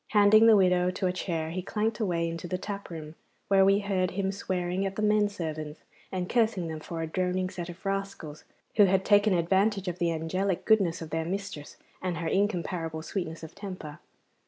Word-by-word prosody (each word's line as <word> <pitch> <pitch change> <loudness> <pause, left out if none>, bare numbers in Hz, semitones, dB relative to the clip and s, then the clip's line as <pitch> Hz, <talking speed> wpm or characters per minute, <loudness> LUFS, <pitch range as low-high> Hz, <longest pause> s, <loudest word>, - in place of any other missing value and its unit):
Handing 215 +2 +7
the 225 - +8
widow 180 -2 +4
to 185 +1 -2
a 180 - +1
chair 165 -3 -3
he 185 +2 -3
clanked 215 +3 -1
away 175 -6 0
into 165 +1 -5
the 185 - -2
tap 200 +1 -6
room, 155 -2 -7 0.4
where 195 -1 +6
we 195 +1 +4
heard 190 -2 0
him 195 +1 -1
swearing 185 -1 -2
at 195 0 -2
the 215 - -3
men 210 -1 +3
servants, 155 -5 -5 0.3
and 185 -1 -2
cursing 220 -7 +1
them 160 -1 -5
for 165 +1 -5
a - - -1
droning 185 +2 -1
set 175 -2 -6
of 175 +3 -11
rascals 195 -6 -4 0.3
who 205 - +8
had 190 0 +2
taken 205 0 +5
advantage 195 +3 +1
of 180 0 -3
the 170 -1 +1
angelic 170 +4 -1
goodness 185 -6 +3
of 160 - -10
their 160 0 -1
mistress 190 -4 -5 0.2
and 180 -2 -2
her 165 0 -3
incomparable 175 -5 -1
sweetness 165 -2 -4
of 160 0 -9
temper. 185 -7 -8
185 Hz, 200 wpm, -28 LUFS, 165-200 Hz, 0.4 s, the